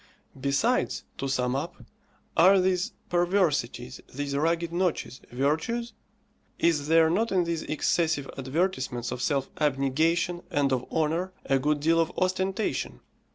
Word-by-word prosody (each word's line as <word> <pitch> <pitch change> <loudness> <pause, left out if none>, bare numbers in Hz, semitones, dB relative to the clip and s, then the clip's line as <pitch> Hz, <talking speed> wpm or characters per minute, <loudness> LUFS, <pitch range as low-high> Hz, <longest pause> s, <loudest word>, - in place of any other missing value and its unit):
Besides, 140 - +1 0.2
to 135 - -2
sum 125 -1 0
up, 150 +5 -3 0.6
are 190 +4 +6
these 185 +4 +1 0.2
perversities, 175 -9 0
these 140 +1 -3
rugged 165 +3 0
notches, 175 -8 -1
virtues? 160 - -1 0.6
Is 150 -4 +1
there 165 0 +5
not 220 +6 +1
in 185 -2 +3
these 170 -1 -2
excessive 155 -2 0
advertisements 135 -3 -1
of 125 - -4
self 135 +1 0
abnegation 160 +5 +1
and 145 -6 +1
of 125 -1 -3
honour 165 +4 0
a 135 -1 +2
good 150 +2 0
deal 165 +2 +3
of 165 +1 +1
ostentation? 185 +3 -1
160 Hz, 130 wpm, -27 LUFS, 140-180 Hz, 0.6 s, are